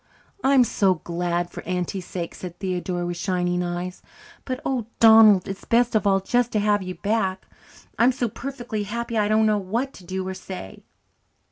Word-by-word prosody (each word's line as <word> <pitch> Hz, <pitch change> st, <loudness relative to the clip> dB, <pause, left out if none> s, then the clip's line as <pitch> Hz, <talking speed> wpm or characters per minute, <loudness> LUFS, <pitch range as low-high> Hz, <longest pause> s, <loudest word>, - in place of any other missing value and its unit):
"I'm 270 Hz, -1 st, +5 dB
so 195 Hz, -5 st, +2 dB
glad 175 Hz, +1 st, -2 dB
for -, -, -7 dB
Auntie's 180 Hz, +1 st, -3 dB
sake," 170 Hz, -2 st, -5 dB
said 180 Hz, -2 st, -8 dB
Theodora, 180 Hz, -2 st, -2 dB
with 175 Hz, 0 st, -3 dB
shining 180 Hz, -1 st, 0 dB
eyes. 175 Hz, +1 st, -4 dB, 0.4 s
"But, 255 Hz, -1 st, -3 dB
oh, 250 Hz, -5 st, -1 dB
Donald, 220 Hz, -4 st, +7 dB
it's 195 Hz, 0 st, -6 dB
best 240 Hz, +1 st, +2 dB
of 215 Hz, -2 st, +2 dB
all 195 Hz, -1 st, +4 dB
just 240 Hz, +5 st, 0 dB
to 215 Hz, -, +2 dB
have 205 Hz, 0 st, +2 dB
you 185 Hz, -1 st, -5 dB
back. 200 Hz, -3 st, -1 dB, 0.5 s
I'm 240 Hz, +3 st, +5 dB
so 245 Hz, -1 st, -1 dB
perfectly 240 Hz, -1 st, -5 dB
happy 235 Hz, +3 st, -4 dB
that 220 Hz, -, +2 dB
I 205 Hz, -, +1 dB
don't 215 Hz, +1 st, +3 dB
know 215 Hz, -1 st, +2 dB
what 230 Hz, +8 st, -2 dB
to 185 Hz, -, -14 dB
do 185 Hz, +1 st, -4 dB
or 190 Hz, -, -3 dB
say." 185 Hz, -, -9 dB
195 Hz, 190 wpm, -24 LUFS, 180-225 Hz, 0.5 s, Donald